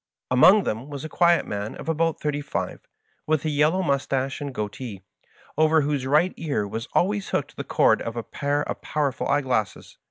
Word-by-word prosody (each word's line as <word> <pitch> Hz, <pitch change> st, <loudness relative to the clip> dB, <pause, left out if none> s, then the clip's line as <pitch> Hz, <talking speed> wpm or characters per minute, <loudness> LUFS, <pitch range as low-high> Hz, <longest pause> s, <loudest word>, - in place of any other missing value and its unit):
Among 185 Hz, +11 st, +7 dB
them 115 Hz, +3 st, -3 dB
was 145 Hz, 0 st, -6 dB
a -, -, -6 dB
quiet 170 Hz, 0 st, +3 dB
man 105 Hz, +1 st, -4 dB
of -, -, -9 dB
about 165 Hz, 0 st, 0 dB
thirty 145 Hz, -1 st, -2 dB
five, 145 Hz, -, -5 dB, 0.4 s
with 155 Hz, 0 st, +1 dB
a 155 Hz, -, +1 dB
yellow 155 Hz, +6 st, +2 dB
mustache 135 Hz, -2 st, -1 dB
and 140 Hz, -1 st, -4 dB
goatee, 105 Hz, -3 st, -6 dB, 0.6 s
over 155 Hz, 0 st, +5 dB
whose 140 Hz, -2 st, -1 dB
right 155 Hz, +7 st, +3 dB
ear 140 Hz, -10 st, -2 dB
was 115 Hz, +3 st, -5 dB
always 200 Hz, +2 st, +1 dB
hooked -, -, -2 dB
the -, -, -5 dB
cord -, -, +3 dB
of 115 Hz, -, -5 dB
a 115 Hz, -, -3 dB
pair 145 Hz, +3 st, -1 dB
of -, -, -5 dB
pow 150 Hz, -2 st, 0 dB
erful -, -, -4 dB
eyeglasses. 130 Hz, -8 st, -1 dB
145 Hz, 190 wpm, -24 LUFS, 130-155 Hz, 0.6 s, Among